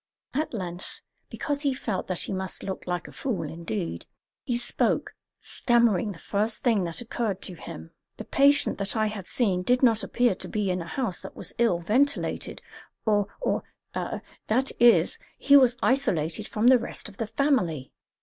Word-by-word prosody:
At 305 Hz, +4 st, -1 dB
length 180 Hz, -4 st, -6 dB, 0.3 s
because 290 Hz, -1 st, -3 dB
he 280 Hz, -3 st, +1 dB
felt 220 Hz, -7 st, -3 dB
that 185 Hz, -2 st, -2 dB
he -, -, -2 dB
must 190 Hz, 0 st, -3 dB
look 190 Hz, -1 st, -5 dB
like 175 Hz, 0 st, -2 dB
a -, -, -11 dB
fool 250 Hz, -8 st, -3 dB
indeed 105 Hz, -, -4 dB, 0.4 s
he 240 Hz, -, 0 dB
spoke, 240 Hz, -, 0 dB, 0.3 s
stammering 235 Hz, -5 st, +2 dB
the 185 Hz, -, -9 dB
first 210 Hz, +5 st, -1 dB
thing 220 Hz, -7 st, +3 dB
that 170 Hz, +6 st, -3 dB
occurred 225 Hz, -4 st, -2 dB
to 185 Hz, -, -5 dB
him: 80 Hz, -, -9 dB, 0.3 s
"The -, -, -6 dB
patient 280 Hz, -4 st, +3 dB
that 200 Hz, +2 st, -3 dB
I 220 Hz, -1 st, +2 dB
have 210 Hz, -4 st, -4 dB
seen 195 Hz, -7 st, +1 dB
did 250 Hz, +7 st, +2 dB
not 225 Hz, -3 st, +5 dB
appear 245 Hz, -2 st, +2 dB
to -, -, -7 dB
be 205 Hz, -3 st, -1 dB
in 180 Hz, 0 st, -1 dB
a 165 Hz, -, -7 dB
house 235 Hz, -3 st, -2 dB
that 190 Hz, -, -10 dB
was -, -, -6 dB
ill 205 Hz, -8 st, +3 dB
ventilated 250 Hz, +11 st, 0 dB, 0.4 s
or 205 Hz, -2 st, +2 dB
or -, -, 0 dB, 0.3 s
that 255 Hz, +5 st, -2 dB
is, 240 Hz, -1 st, +5 dB, 0.2 s
he 285 Hz, -, +5 dB
was 255 Hz, -3 st, +6 dB
isolated 210 Hz, -, +1 dB
from 215 Hz, +2 st, -1 dB
the 255 Hz, 0 st, +7 dB
rest 235 Hz, -, -2 dB
of 205 Hz, -1 st, -14 dB
the 225 Hz, -, -2 dB
family." 185 Hz, -, 0 dB
215 Hz, 180 wpm, -26 LUFS, 180-245 Hz, 0.4 s, the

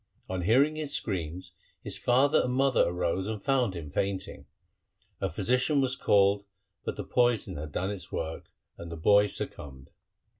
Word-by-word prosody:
On 95 Hz, -1 st, -3 dB
hearing 135 Hz, -, +3 dB
his 150 Hz, -2 st, -2 dB
screams 90 Hz, -2 st, -3 dB, 0.3 s
his 100 Hz, -, -2 dB
father 125 Hz, +7 st, +3 dB
and 125 Hz, -, -1 dB
mother 135 Hz, 0 st, +3 dB
arose 90 Hz, +2 st, -1 dB
and 110 Hz, -1 st, -3 dB
found 125 Hz, -4 st, +1 dB
him 75 Hz, -4 st, -7 dB
fainting. 95 Hz, +2 st, -3 dB, 0.7 s
A 95 Hz, -, -1 dB
physician 125 Hz, -, +1 dB
was 130 Hz, -1 st, +1 dB
called, 100 Hz, -2 st, +3 dB, 0.4 s
but -, -, -3 dB
the -, -, -3 dB
poison 120 Hz, -3 st, +1 dB
had 75 Hz, 0 st, -6 dB
done 95 Hz, +7 st, -2 dB
its 95 Hz, -5 st, -8 dB
work, 80 Hz, +1 st, -5 dB, 0.3 s
and 85 Hz, 0 st, -8 dB
the 85 Hz, -, -6 dB
boy 100 Hz, +5 st, +5 dB
succumbed. 65 Hz, -8 st, -5 dB
100 Hz, 160 wpm, -28 LUFS, 90-125 Hz, 0.7 s, boy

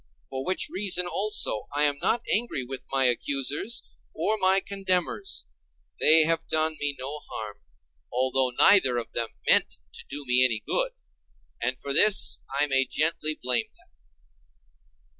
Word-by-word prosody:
For 130 Hz, 0 st, -6 dB
which 185 Hz, +5 st, 0 dB
reason 185 Hz, -2 st, +1 dB
also, 195 Hz, -, +1 dB
I 145 Hz, -, +2 dB
am 145 Hz, -1 st, +1 dB
not 235 Hz, 0 st, 0 dB
angry 215 Hz, -, 0 dB
with 130 Hz, +1 st, -8 dB
my 135 Hz, -1 st, +1 dB
accusers, 140 Hz, -, -1 dB, 0.3 s
or 215 Hz, -, 0 dB
my 190 Hz, -2 st, +3 dB
condemners; 195 Hz, -, -2 dB, 0.5 s
they 160 Hz, +1 st, +6 dB
have 165 Hz, +1 st, 0 dB
done 155 Hz, 0 st, +1 dB
me 145 Hz, -1 st, -1 dB
no 140 Hz, +4 st, -5 dB
harm, 105 Hz, -2 st, -7 dB, 0.5 s
although 130 Hz, +1 st, 0 dB
neither 130 Hz, -1 st, +4 dB
of 120 Hz, -, -5 dB
them 115 Hz, -1 st, -3 dB, 0.2 s
meant -, -, +3 dB, 0.2 s
to -, -, -10 dB
do 145 Hz, 0 st, -8 dB
me 125 Hz, 0 st, +3 dB
any 120 Hz, -4 st, +1 dB
good; -, -, -1 dB, 0.7 s
and 125 Hz, +2 st, -2 dB
for 140 Hz, -, -4 dB
this 205 Hz, +7 st, +5 dB
I 140 Hz, +2 st, +1 dB
may 135 Hz, -2 st, +1 dB
gently 155 Hz, +1 st, -1 dB
blame 125 Hz, -2 st, 0 dB
them. -, -, -27 dB
145 Hz, 150 wpm, -25 LUFS, 130-185 Hz, 0.7 s, they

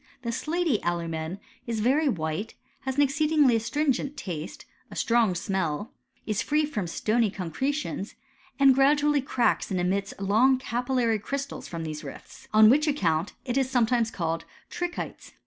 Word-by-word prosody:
The 235 Hz, -, -2 dB
slaty 310 Hz, -, 0 dB
alumea 170 Hz, +1 st, -2 dB, 0.3 s
is 230 Hz, -2 st, -2 dB
very 275 Hz, +7 st, +3 dB
white, 165 Hz, +2 st, -3 dB, 0.3 s
has 265 Hz, -1 st, -1 dB
an 290 Hz, -, +4 dB
exceedingly 295 Hz, -2 st, +3 dB
astringent 270 Hz, +4 st, 0 dB
taste, 165 Hz, -4 st, -6 dB, 0.2 s
a -, -, -10 dB
strong 230 Hz, -6 st, +2 dB
smell, 175 Hz, +1 st, -2 dB, 0.3 s
is 215 Hz, -1 st, -1 dB
free 300 Hz, 0 st, +1 dB
from 210 Hz, -, -3 dB
stony 220 Hz, +6 st, +1 dB
concretions, 205 Hz, -, -3 dB, 0.4 s
and 275 Hz, -1 st, +7 dB
gradually 290 Hz, +2 st, +3 dB
cracks 255 Hz, -2 st, +1 dB
and 190 Hz, -3 st, -1 dB
emits 195 Hz, +3 st, -1 dB
long 220 Hz, +7 st, +3 dB
capillary 245 Hz, -2 st, 0 dB
crystals 275 Hz, +6 st, -5 dB
irotk 165 Hz, -1 st, -5 dB
these 155 Hz, -1 st, -5 dB
rifts; -, -, -11 dB
on 215 Hz, 0 st, +7 dB
which 300 Hz, +4 st, +3 dB
account 175 Hz, -, 0 dB
it 250 Hz, 0 st, -1 dB
is 260 Hz, -1 st, 0 dB
sometimes 240 Hz, -2 st, +2 dB
called 165 Hz, -5 st, -2 dB, 0.3 s
trichiies. 350 Hz, 0 st, -5 dB
230 Hz, 145 wpm, -27 LUFS, 190-275 Hz, 0.4 s, and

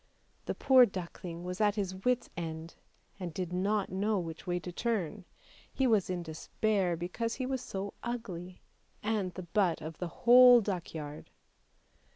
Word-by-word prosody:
The -, -, -2 dB
poor 260 Hz, -2 st, +6 dB
duckling 175 Hz, -2 st, -7 dB
was 180 Hz, +3 st, -4 dB
at 205 Hz, -1 st, +3 dB
his 195 Hz, -3 st, -2 dB
wit's 240 Hz, +6 st, 0 dB
end, 165 Hz, -1 st, -5 dB, 0.5 s
and 180 Hz, -2 st, -4 dB
did 180 Hz, +1 st, -4 dB
not 200 Hz, +2 st, 0 dB
know 205 Hz, +3 st, +1 dB
which 165 Hz, -2 st, -5 dB
way 175 Hz, 0 st, 0 dB
to 180 Hz, -, -6 dB
turn; 205 Hz, -2 st, -2 dB, 0.5 s
he 265 Hz, -, 0 dB
was 215 Hz, -7 st, +3 dB
in 180 Hz, -1 st, -2 dB
despair 180 Hz, +3 st, -1 dB
because 230 Hz, +7 st, -3 dB
he 255 Hz, -, -3 dB
was 260 Hz, -1 st, -2 dB
so 195 Hz, -2 st, -5 dB
ugly, 185 Hz, -7 st, -6 dB, 0.4 s
and 210 Hz, -4 st, 0 dB
the 185 Hz, -, -5 dB
butt 175 Hz, -1 st, +1 dB
of 155 Hz, +1 st, -8 dB
the 180 Hz, -, -2 dB
whole 245 Hz, +6 st, +8 dB
duckyard. 165 Hz, -7 st, -5 dB
185 Hz, 160 wpm, -31 LUFS, 175-220 Hz, 0.5 s, whole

